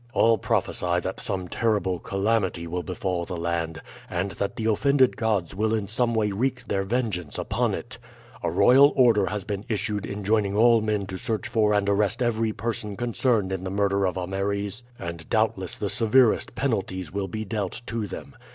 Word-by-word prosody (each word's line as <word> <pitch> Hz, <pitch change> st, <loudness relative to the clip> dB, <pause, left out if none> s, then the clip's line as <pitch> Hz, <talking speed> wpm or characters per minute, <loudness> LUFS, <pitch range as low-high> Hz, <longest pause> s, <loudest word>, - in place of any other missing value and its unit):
All 115 Hz, -1 st, +4 dB
prophesy 90 Hz, -2 st, 0 dB
that 95 Hz, +2 st, -4 dB
some 95 Hz, -2 st, -3 dB
terrible 95 Hz, -4 st, 0 dB
calamity 95 Hz, -3 st, 0 dB
will 90 Hz, +2 st, -3 dB
befall 90 Hz, -1 st, -2 dB
the 85 Hz, +1 st, -5 dB
land, 85 Hz, -1 st, -2 dB, 0.3 s
and 90 Hz, +2 st, -2 dB
that 100 Hz, -, -3 dB
the 110 Hz, -, -3 dB
offended 130 Hz, +4 st, +3 dB
gods 105 Hz, -7 st, 0 dB
will 110 Hz, +3 st, +1 dB
in 105 Hz, -2 st, -2 dB
some 115 Hz, +3 st, 0 dB
way 105 Hz, -2 st, +1 dB
wreak 125 Hz, +4 st, -2 dB
their 100 Hz, -, 0 dB
vengeance 95 Hz, -6 st, -2 dB
upon -, -, 0 dB
it. -, -, -7 dB, 0.4 s
A -, -, 0 dB
royal 135 Hz, +3 st, +6 dB
order 115 Hz, -7 st, +4 dB
has 105 Hz, -1 st, -3 dB
been 100 Hz, 0 st, -4 dB
issued 105 Hz, -1 st, -2 dB
enjoining 100 Hz, 0 st, 0 dB
all 115 Hz, 0 st, +6 dB
men 105 Hz, -2 st, -1 dB
to 95 Hz, -1 st, -6 dB
search 110 Hz, +3 st, -2 dB
for 110 Hz, -2 st, +2 dB
and 100 Hz, -1 st, +1 dB
arrest 105 Hz, +4 st, +1 dB
every 115 Hz, -2 st, +1 dB
person 105 Hz, -2 st, -3 dB
concerned 120 Hz, -4 st, +1 dB
in 95 Hz, -1 st, -3 dB
the 95 Hz, -, -3 dB
murder 100 Hz, 0 st, +1 dB
of 90 Hz, -, -3 dB
Ameres, 100 Hz, +3 st, -2 dB, 0.2 s
and 85 Hz, -1 st, -7 dB
doubtless 110 Hz, -4 st, 0 dB
the 105 Hz, -, -2 dB
severest 115 Hz, +3 st, +3 dB
penalties 95 Hz, -, -2 dB
will 100 Hz, -1 st, -2 dB
be 110 Hz, +4 st, -4 dB
dealt 105 Hz, +1 st, -3 dB
to 115 Hz, -2 st, -3 dB
them. -, -, -8 dB
105 Hz, 180 wpm, -25 LUFS, 95-115 Hz, 0.4 s, royal